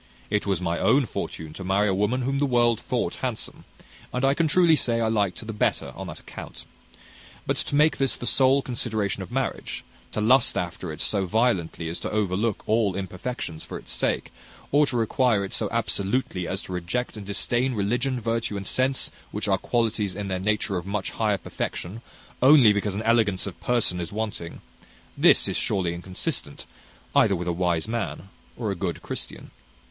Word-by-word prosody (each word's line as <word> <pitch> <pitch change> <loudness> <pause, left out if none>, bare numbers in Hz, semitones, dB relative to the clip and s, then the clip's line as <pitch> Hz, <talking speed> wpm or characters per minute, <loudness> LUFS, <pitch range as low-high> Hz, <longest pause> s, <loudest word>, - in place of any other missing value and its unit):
It 105 -1 0
was 95 -4 +1
my 85 -2 -1
own 120 +8 +4
fortune 80 -7 -5
to 95 - -7
marry 95 +3 +2
a 95 - +2
woman 105 +7 +1
whom 135 +2 0
the 145 - +2
world 120 -3 +3
thought - - -2
handsome, - - -4 0.5
and 125 +1 0
I 135 - +4
can 165 +2 +2
truly 170 +1 +5
say 120 -5 +2
I 115 - +1
liked 100 -5 0
her - - -9
the 110 - -5
better 105 - 0
on - - -6
that - - -8
account. - - -9 0.8
But - - +1
to - - -1
make 150 +2 +4
this 135 -1 +2
the - - -6
sole 135 +2 +4
consideration 110 -5 -1
of 95 - -8
marriage, 130 0 -2 0.3
to - - -1
lust 120 +4 +4
after 90 -1 -3
it 75 - -6
so 100 -3 +1
violently 95 -6 +1
as 85 - -4
to - - -4
overlook 105 +1 0
all 110 -3 +2
imperfections 95 -2 -4
for - - -6
its - - -8
sake, - - -1 0.4
or 145 +1 +5
to 130 -2 -1
require 115 -2 +2
it 95 - -7
so - - 0
absolutely 100 -3 -1
as 95 +2 -3
to 95 - -7
reject 90 +9 -2
and 105 - -7
disdain 120 +5 0
religion, 120 +5 0
virtue, 115 -2 -1
and 100 - -5
sense, 130 +5 +1 0.2
which - - -3
are - - +2
qualities 110 -4 0
in 100 -1 -4
their 95 -1 -1
nature 100 -1 0
of 90 +2 -5
much 100 -1 -2
higher 105 -3 +1
perfection, 95 +3 -5 0.4
only 130 -5 +8
because 105 -1 -1
an 105 - -3
elegance 110 -4 +2
of 100 - -7
person 120 -7 +2
is 85 - -4
wanting: 105 -5 -4 0.5
this - - +5
is - - -1
surely 90 -3 0
inconsistent, 90 +2 -3 0.5
either 100 - +5
with 90 0 -4
a 85 - +1
wise 85 -1 0
man 110 -3 -3 0.3
or 110 -4 -1
a - - -2
good 85 -1 -3
Christian. - - -5
105 Hz, 195 wpm, -25 LUFS, 95-120 Hz, 0.8 s, only